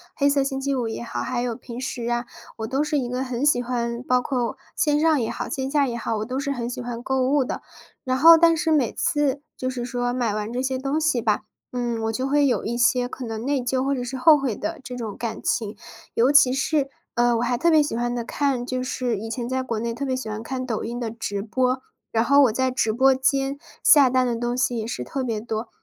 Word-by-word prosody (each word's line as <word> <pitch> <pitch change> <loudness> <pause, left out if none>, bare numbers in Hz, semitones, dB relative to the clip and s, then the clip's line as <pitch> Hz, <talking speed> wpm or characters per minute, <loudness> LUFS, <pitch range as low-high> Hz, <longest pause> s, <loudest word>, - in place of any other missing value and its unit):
黑 280 - +2
色 280 -1 +3
星 270 0 -2
期 275 +1 -1
五 245 -3 -1
也 225 - -5
好， - - -4
还 245 -1 -2
有 240 -2 -2
平 240 -1 -8
时 245 -2 -3
啊， 240 0 -1 0.3
我 220 - -3
都 265 +6 0
是 300 0 0
一 255 -3 -1
个 250 +2 -2
很 255 +1 -2
喜 290 -4 +4
欢- 235 -1 -2
包 250 0 +2
括 250 0 -2 0.2
线 295 -3 +2
上 310 -4 +3
也 225 - -1
好， - - -4
线 265 -1 -3
下 285 -1 +3
也 240 - -3
好- 225 -1 -2
我 210 - -3
都 255 +3 -3
是 280 0 -2
很 240 -3 -3
喜 250 +1 -5
欢 240 0 -5
购 265 0 0
物 285 -1 +3
的。 - - -4 0.4
然 255 0 0
后 330 +4 +9
但 330 0 +5
是 320 +1 0
每 280 -8 +3
次 290 -2 0
就 255 - -3
是 245 -2 -4
说 245 0 -1
买 245 -4 0
完 210 +1 -3
这 245 - -3
些 260 0 -1
东 275 +4 -1
西 305 -6 +1
吧， 215 -2 +1 0.3
嗯， 240 -2 -2
我 225 - 0
就 260 +4 -2
会 290 0 +3
有 250 - 0
一 235 - -2
些 245 +1 +3
可 255 - -8
能 225 +2 -5
内 280 -2 +1
疚， 255 +1 0
或 280 - +1
者 255 -2 -2
是 260 +2 -5
后 310 +3 +7
悔 260 -6 -1
的 325 +6 -4
这 250 - -7
种 220 -5 -5
感 230 -2 -4
情。 215 -1 -1 0.4
尤 250 +5 +4
其 285 -3 +6
是， 275 +1 0 0.2
呃， 240 0 +3
我 230 - 0
还 245 0 0
特 340 - +3
别 310 -2 +5
喜 290 - -3
欢 240 +1 -1
的 240 - -2
看 260 0 -1
就 255 0 -2
是 250 -4 -2
以 225 +2 -6
前 235 +1 -3
在 260 +1 -1
国 235 -4 -3
内 230 +1 -2
特 275 - -5
别 260 -2 0
喜 255 -3 -5
欢 215 0 -4
看 255 +2 -4
抖 230 -4 -2
音 240 +2 -4
的 230 -3 -3
直 205 -3 -4
播， 255 +3 0 0.3
然 225 0 +2
后 280 +2 +6
我 250 - +4
在 260 +3 0
直 235 -3 +1
播 265 +4 +4
间 275 0 0 0.2
下 280 -4 +7
单 255 0 +2
的 240 -1 0
东 240 +1 -2
西 255 -1 +1
也 220 - -4
是 125 - -4
特 265 - -4
别 230 -4 -2
多。 220 0 -4
250 Hz, 285 characters per minute, -24 LUFS, 235-270 Hz, 0.4 s, 后